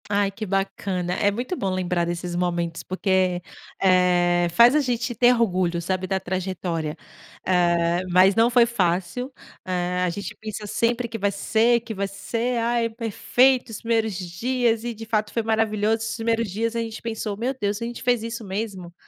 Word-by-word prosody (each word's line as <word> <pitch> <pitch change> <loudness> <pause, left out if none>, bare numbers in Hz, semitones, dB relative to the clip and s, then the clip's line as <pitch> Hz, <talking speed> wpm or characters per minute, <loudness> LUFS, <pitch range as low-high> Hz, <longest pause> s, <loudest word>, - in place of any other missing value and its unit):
Ai, 200 -1 +1
que 215 +2 -6
bacana. 195 -2 -2
É 200 +2 +2
muito 245 - -3
bom 195 - -2
lembrar 180 -2 0
desses 175 0 -4
momentos 170 -2 -1
porque, 185 -1 0 0.4
eh, 180 -2 +3
faz 235 - +6
a - - +5
gente 245 -3 -1
ter 245 +2 +5
orgulho, 185 -7 +1
sabe, 185 +2 -2
da 190 0 0
trajetória. 180 -4 -3 0.5
Eh, 175 -1 +2
mas 185 +2 +5
não 230 +1 +4
foi 240 -1 +5
fácil, 195 +3 -1 0.3
eh, 180 0 -1
a 180 - +1
gente 190 +2 -6
pensa 215 -1 -6
sempre 235 +3 0
que 230 - -5
vai 200 -1 0
ser, 230 +4 +2
que 225 -1 -7
vai 200 -1 -2
ser, 230 +5 -2
"ai, 235 0 +1
é - - -1
perfeito, 245 +3 +2
os 220 - -6
primeiros 225 -3 0
dias", 225 +6 -1
e 240 0 -3
de 225 0 -9
fato 215 -1 -1
foi 230 - -1
maravilhoso 220 -1 +1
os 225 0 -4
primeiros 230 -1 0
dias, 225 +4 -2
a 230 - 0
gente 225 -1 -6
pensou: 220 -3 -4
"Meu 245 +5 -1
Deus, 205 +1 -1
a - - -2
gente 240 0 -6
fez 245 -2 +2
isso 230 0 -5
mesmo?". 190 -3 -5
205 Hz, 185 wpm, -24 LUFS, 180-230 Hz, 0.5 s, faz